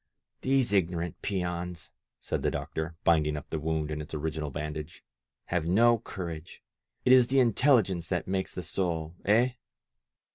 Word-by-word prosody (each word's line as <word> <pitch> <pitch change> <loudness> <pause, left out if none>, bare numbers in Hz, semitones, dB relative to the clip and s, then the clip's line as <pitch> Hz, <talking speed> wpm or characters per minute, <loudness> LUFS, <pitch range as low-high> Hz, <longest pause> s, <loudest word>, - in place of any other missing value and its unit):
"These 130 -5 +2
ignorant 85 -3 0
peons," 90 -3 -3 0.3
said - - -3
the - - +2
doctor, 80 +1 -4
binding 75 -2 +3
up 75 - -7
the 80 - -1
wound 80 0 -1
in 75 0 -3
its 75 +1 -7
original 75 0 -3
bandage, 75 +3 -6 0.4
"have 85 -2 -1
no 115 +6 +5
courage. 85 -6 -7 0.4
It 125 - +7
is 125 -2 +7
the 135 +2 +3
intelligence 115 - +3
that 90 -3 -2
makes 95 0 -2
the 90 - -4
soul, 85 -2 -2
eh?" 115 +5 +4
85 Hz, 150 wpm, -29 LUFS, 80-100 Hz, 0.4 s, It